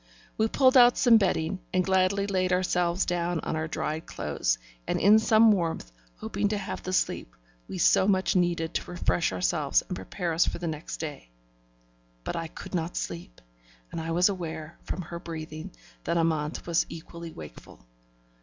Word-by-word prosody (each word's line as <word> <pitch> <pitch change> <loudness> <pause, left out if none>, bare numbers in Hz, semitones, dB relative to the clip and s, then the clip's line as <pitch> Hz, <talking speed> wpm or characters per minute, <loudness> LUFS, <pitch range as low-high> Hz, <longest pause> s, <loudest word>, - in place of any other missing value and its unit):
We 220 - +2
pulled 260 +3 +4
out 245 -1 +7
some 240 -3 +6
bedding, 185 -2 0
and 185 -1 +1
gladly 190 +1 +2
laid 185 -2 0
ourselves 180 0 +1
down 175 -1 -1
in - - -1
our 160 0 -2
dried 155 0 -3
clothes - - -1 0.3
and - - 0
in 210 +4 +6
some 220 0 +5
warmth, 165 - -1 0.3
hoping - - -1
to 210 +1 -1
have 195 - -5
the 185 - -5
sleep - - -1 0.3
we - - -6
so 190 - +4
much 190 -2 +2
needed 175 -2 +1
to - - -3
refresh 175 -1 0
us 180 - 0
and 155 +3 0
prepare 175 -2 -4
us 165 - +3
for - - -2
the 175 - -5
next 155 -1 -4
day. 150 - -6 0.9
But - - -4
I 165 -1 -3
could - - -10
not 170 -1 -2
sleep, 170 - -6 0.5
and 165 - -4
I 160 - -5
was 175 +2 +4
aware, 165 -4 -5
from 185 - -4
her 170 +1 -7
breathing, 160 +1 -7 0.4
that 170 - 0
Amante 160 -2 0
was 170 -1 +1
equally 170 +1 -8
wakeful. 75 - -12
170 Hz, 175 wpm, -27 LUFS, 160-185 Hz, 0.9 s, out